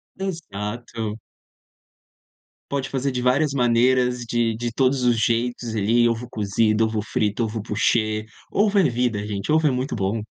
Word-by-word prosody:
Exato. 115 - -5 1.5
Pode 140 -1 -2
fazer 135 0 -1
de 125 - -2
várias 135 +3 +2
maneiras, 125 0 +3
de 115 -1 0
de 120 0 -3
todos 130 0 +2
os 120 -2 +3
jeitos 120 +1 0
ali, 115 +3 +3
ovo 115 +1 -3
cozido, 110 +1 +1
ovo 110 -1 -1
frito, 105 +1 -1
ovo 110 0 -4
poché, 110 0 0 0.3
ovo 205 0 +2
é 190 - +6
vida 120 -5 0
gente, 105 +5 -3
ovo 160 -1 +4
é - - +3
muito 130 +1 -2
bom. 105 +2 -1
120 Hz, 150 wpm, -23 LUFS, 110-130 Hz, 1.5 s, é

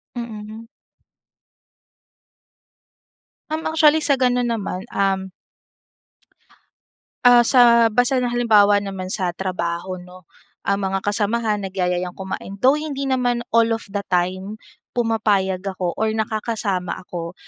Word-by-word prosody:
Mm. 220 -1 -7 2.8
Uhm, 315 +1 -2
actually 315 -1 +4
sa 280 -3 +2
ganun 245 -1 +1
naman 195 -4 -3
uhm 190 -1 0 1.9
ah, 245 -1 +8
sa 235 -1 +5
basta 245 +4 +2
na 245 - 0
halimbawa 215 -4 +4
naman 195 -2 -5
sa 185 -3 -2
trabaho, 185 0 -3
'no? 180 -1 -14 0.4
Ah, 200 - +2
mga 195 -1 -1
kasamahan 210 +1 -1
nagyayayang 180 -2 -2
kumain, 190 +1 -7
though 265 +3 +5
hindi 285 -3 -4
naman 245 -2 0
all 230 0 +4
of 225 -1 -5
the 200 0 -3
time 185 +4 -1 0.4
pumapayag 210 -5 +1
ako 185 -3 -3
or 220 - 0
nakakasama 215 -4 -2
ako. 170 -2 -6
210 Hz, 115 wpm, -21 LUFS, 190-240 Hz, 2.8 s, ah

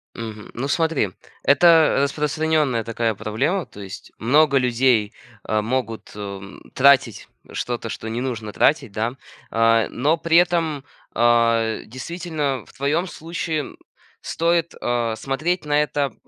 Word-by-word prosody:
Мгм. 110 -2 -7
Ну 130 +4 -3
смотри, 160 - +1 0.3
это 160 +1 +5
распространенная 150 -3 0
такая 115 -1 -1
проблема, 135 - -1
то 100 - -13
есть 100 +1 -10
много 140 +4 +3
людей, 120 -4 +2 0.4
э, 110 - +1
могут, 115 0 -3
м, 100 -1 -8
тратить 135 -5 +4 0.2
что-то, 120 -1 -4
что 110 - -6
не 115 +2 -3
нужно 115 -5 -4
тратить, 130 -8 +2
да, 115 +4 -2 0.4
а, 115 0 +3
но 145 +6 +1
при 165 0 +2
этом, 165 -5 +1 0.3
а, 115 -1 +3
действительно, 145 - -4
в - - -18
твоем 150 +7 0
случае, 165 -1 -4
м, 145 - -7 0.4
стоит, 170 0 0
а, 120 -2 -1
смотреть 155 +8 -2
на 150 0 +3
это 145 -2 -2
130 Hz, 135 wpm, -22 LUFS, 115-155 Hz, 0.4 s, это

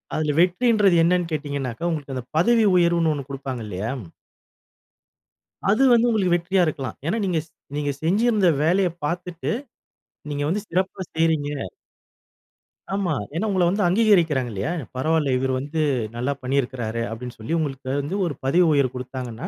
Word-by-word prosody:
அதில 150 -1 0
வெற்றின்றது 200 +1 +3
என்னனு 175 0 +2
கேட்டீங்கனாக்கா, 140 -1 -3
உங்களுக்கு 145 -4 -4
அந்த 125 - -4
பதவி 225 +6 +4
உயர்வுனு 170 -2 +3
ஒண்ணு 140 -2 -4
குடுப்பாங்க 135 -3 -5
இல்லையா? 105 +4 -3 1.8
அது 215 +7 +4
வந்து 235 0 +4
உங்களுக்கு 195 -6 +2
வெற்றியா 180 +2 +1
இருக்கலாம். 140 -4 -4
ஏன்னா 200 +8 0
நீங்க 175 -4 +1
ஸ் 160 - -28 0.3
நீங்க 145 -1 0
செஞ்சிருந்த 205 +1 +3
வேலையை 180 +3 +3
பார்த்துட்டு, 175 +1 -3 0.8
நீங்க 145 0 -2
வந்து 200 +6 -1
சிறப்பா 185 +2 -1
செய்றீங்க 160 -2 +1 1.5
ஆமா. 195 -5 0 0.2
ஏன்னா 205 +6 0
உங்கள 185 -3 +2
வந்து 200 +3 0
அங்கீகரிக்கிறாங்க 175 - +3
இல்லையா! 105 - -2 0.2
பரவால்ல 150 0 +1
இவர் 130 +1 0
வந்து, 150 +3 -3 0.3
"நல்லா 125 +4 -1
பண்ணியிருக்கிறாரு" 125 -4 -1
அப்படின்னு 120 +2 -7
சொல்லி 110 +8 -4
உங்களுக்கு 135 -4 -4
வந்து 145 +7 -4
ஒரு 165 - -2
பதவி 175 +7 +4
உயர்வு 140 -3 +2
கொடுத்தாங்கன்னா, 125 +2 -6
160 Hz, 140 wpm, -23 LUFS, 135-180 Hz, 1.8 s, பதவி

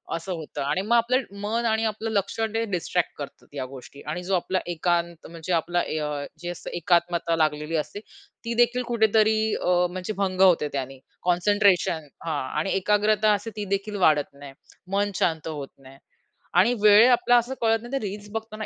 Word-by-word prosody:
असं 170 +3 -5
होतं 160 -3 -6
आणि 145 +7 0
मग 220 +4 +1
आपलं 245 +3 +2 0.2
मन 225 +3 -1
आणि 220 0 +1
आपलं 220 +1 -2
लक्ष, 200 +1 -1
ते 225 0 0
डिस्ट्रॅक्ट 180 0 -1
करतात 145 -2 -9
या 135 -2 -3
गोष्टी 135 +2 -12
आणि 180 +4 -4
जो 190 +1 0
आपला 185 +1 0
एकांत 170 0 -1
म्हणजे 170 +1 -5
आपला 175 +1 +1
अ, 150 -3 -2
जे 175 +1 -5
असतं 175 - -7
एकात्मता 170 0 +1
लागलेली 155 0 0
असते, 155 +6 -4 0.5
ती 235 - -2
देखील 240 +1 +3
कुठेतरी 220 -2 +3 0.2
अ, - - -2 0.2
म्हणजे 185 +3 -4
भंग 190 -2 -1
होते 175 -5 +5
त्यानी. 135 -1 -4 0.2
कॉन्सन्ट्रेशन 180 -3 +2 0.2
हां 155 -4 -2 0.2
आणि 195 - -1
एकाग्रता 210 +2 +2
असे 205 +2 -3
ती 210 - -3
देखील 205 +1 -6
वाढत 150 -2 +2
नाही. 140 -1 -11 0.4
मन 205 +1 +1
शांत 160 -2 0
होत 145 -4 -5
नाही. 135 0 -15 0.6
आणि 190 +8 +4
वेळ 210 +3 +8
आपला 245 0 +4
असं 240 +2 0
कळत 225 -1 +3
नाही 240 - -9
तर 275 - 0
रील्स 205 +1 -6
बघताना 220 -1 -5
185 Hz, 180 wpm, -25 LUFS, 160-215 Hz, 0.6 s, वेळ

